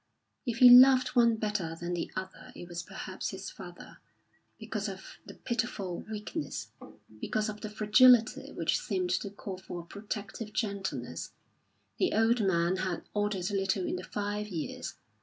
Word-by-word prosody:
If 235 -1 -1
he 250 0 +9
loved 255 +1 +8
one 235 -2 +4
better 210 -7 -2
than 175 0 -3
the 175 - -3
other 190 0 -7
it 175 - -9
was 175 0 -5
perhaps - - -6
his - - -7
father, - - -11 0.6
because - - -4
of - - -10
the - - -10
pitiful 215 -7 -3
weakness, 210 -9 -5 0.5
because 215 - -1
of 210 0 -7
the 215 - -5
fragility 220 +3 +5
which - - 0
seemed 370 -7 -2
to 205 - -1
call 195 -1 -7
for 180 -2 -7
a - - -15
protective 205 +2 -6
gentleness. 195 - -3 0.7
The - - +2
old 225 +1 +3
man 175 -1 +2
had 185 -2 -2
altered 205 -3 -1
little 195 -1 0
in - - -2
the 180 - -7
five 205 +1 -3
years. 170 -7 -5
205 Hz, 160 wpm, -30 LUFS, 185-225 Hz, 0.7 s, he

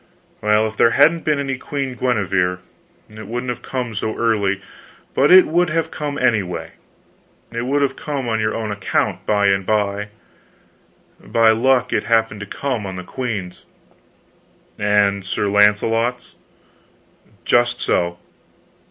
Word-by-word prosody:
"Well, 105 +1 +3
if 110 - -8
there 115 - +4
hadn't 160 +4 +4
been 150 -2 +2
any 135 -2 -3
Queen 135 -2 -4
Guenever, 95 -8 0 0.5
it 110 -1 -11
wouldn't 125 +2 -3
have 120 - -7
come 125 -3 -4
so 110 +1 -3
early; 100 -4 +1 0.5
but 140 +4 +3
it 185 0 +9
would 175 +1 +1
have 160 0 -1
come, 145 -2 -4
anyway. 110 -9 0 0.8
It 120 +1 -4
would 140 +1 +1
have 140 - 0
come 140 -4 -4
on 110 -1 0
your 110 0 -1
own 110 -2 -3
account 95 -2 -1
by 105 -1 +2
and 95 0 +1
by; 105 0 -1 1.2
by 115 -1 +3
luck, 125 +2 +2
it - - 0
happened 115 -2 +1
to 105 - -7
come 125 -4 -3
on 95 - -6
the 90 - -6
queen's." 100 -3 -5 1.2
"And 105 -1 +2
Sir 100 +2 -2
Launcelot's?" 110 +4 +2 1.1
"Just 120 0 +2
so." 85 0 0
110 Hz, 145 wpm, -20 LUFS, 100-130 Hz, 1.2 s, it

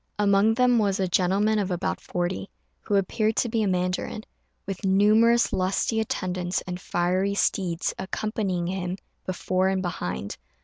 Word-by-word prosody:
Among 205 +1 +3
them 250 -1 +4
was 200 -2 +1
a 190 - +1
gentleman 195 +5 +2
of 200 -2 -1
about 180 +1 -2
forty, 180 +2 -3 0.3
who 205 - -2
appeared 215 +3 +1
to 240 - +1
be 225 0 0
a 210 - +1
mandarin, 180 +3 -1 0.4
with 195 +1 -5
numerous 215 +5 +4
lusty 190 +4 0
attendants 185 -4 -2
and 180 0 -5
fiery 185 +3 0
steeds 180 -4 0
accompanying 190 -2 -2
him 180 0 -3 0.3
before 185 0 0
and 190 0 0
behind. 90 - -4
190 Hz, 145 wpm, -25 LUFS, 180-215 Hz, 0.4 s, them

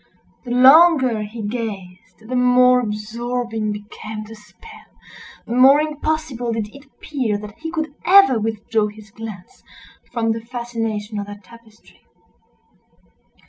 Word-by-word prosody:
The - - -8
longer 260 -2 +6
he 215 +2 -7
gazed 205 -2 -7
the 255 - -3
more 250 0 +5
absorbing 225 0 -3
became 210 +1 -7
the 215 +1 -11
spell—the 235 - -14
more 265 +3 +7
impossible 305 -5 -2
did 220 -2 -3
it 280 +1 -14
appear 265 -6 -3
that 210 0 -11
he 325 - -5
could 315 -3 -4
ever 375 - +6
withdraw 220 0 -1
his 210 0 -13
glance 215 -4 -10 0.5
from 230 -2 0
the 225 0 -3
fascination 225 -3 -4
of 200 - -5
that 205 0 -10
tapestry. 230 +1 -19
230 Hz, 125 wpm, -20 LUFS, 215-255 Hz, 0.5 s, more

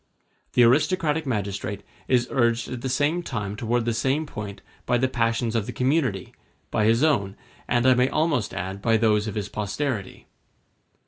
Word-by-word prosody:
The 125 - +5
aristocratic 155 +4 +2
magistrate 100 -3 -3 0.2
is 125 -2 +2
urged 120 -2 +1
at 125 -1 -5
the 130 - -3
same 145 +6 +1
time 105 - -4
toward 115 +2 -1
the 120 - 0
same 135 +7 0
point 105 -7 -7 0.2
by 125 - +3
the 130 +2 +2
passions 115 -1 0
of 110 -3 0
the - - -3
community, 130 - 0 0.4
by 105 - +1
his 115 +5 +3
own, 100 -11 +1 0.3
and 120 0 +1
I 130 - +7
may 125 +1 +2
almost 155 -8 0
add 95 +2 -5
by 115 +1 +3
those 105 -1 +2
of 105 - -4
his 105 -2 -2
posterity. 105 +1 -4
120 Hz, 175 wpm, -24 LUFS, 105-130 Hz, 0.4 s, I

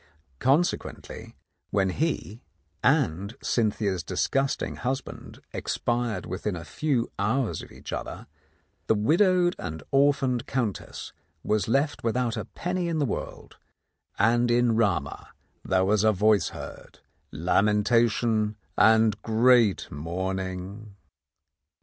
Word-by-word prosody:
Consequently, 145 +7 -1 0.3
when 95 -2 +1
he 120 - -2 0.4
and 100 +8 +1
Cynthia's 105 -5 0
disgusting 135 +10 -1
husband 130 +2 -5
expired 120 -5 -2
within 95 +2 -3
a 85 - -7
few 135 -7 -1
hours 110 +4 0
of - - -12
each - - -9
other, - - -5 0.6
the 110 - +4
widowed 175 - +3
and 80 -1 -6
orphaned 135 -3 +2
Countess 120 -7 -3 0.3
was 105 -3 0
left 140 +6 0
with 115 +1 0
out 120 -3 0
a - - -4
penny 180 0 -3
in 165 -1 -1
the 150 - +1
world, 120 - -6 0.6
and 120 +3 +3
in 120 -1 +3
Rama 95 -10 0 0.3
was 95 +2 +2
there 110 - +4
a - - +3
voice 105 +1 +3
heard, - - -10 0.3
lamentation 105 +5 +2 0.2
and 110 -1 +4
great 115 - +3
mourning 95 +5 -4
110 Hz, 115 wpm, -26 LUFS, 100-125 Hz, 0.6 s, the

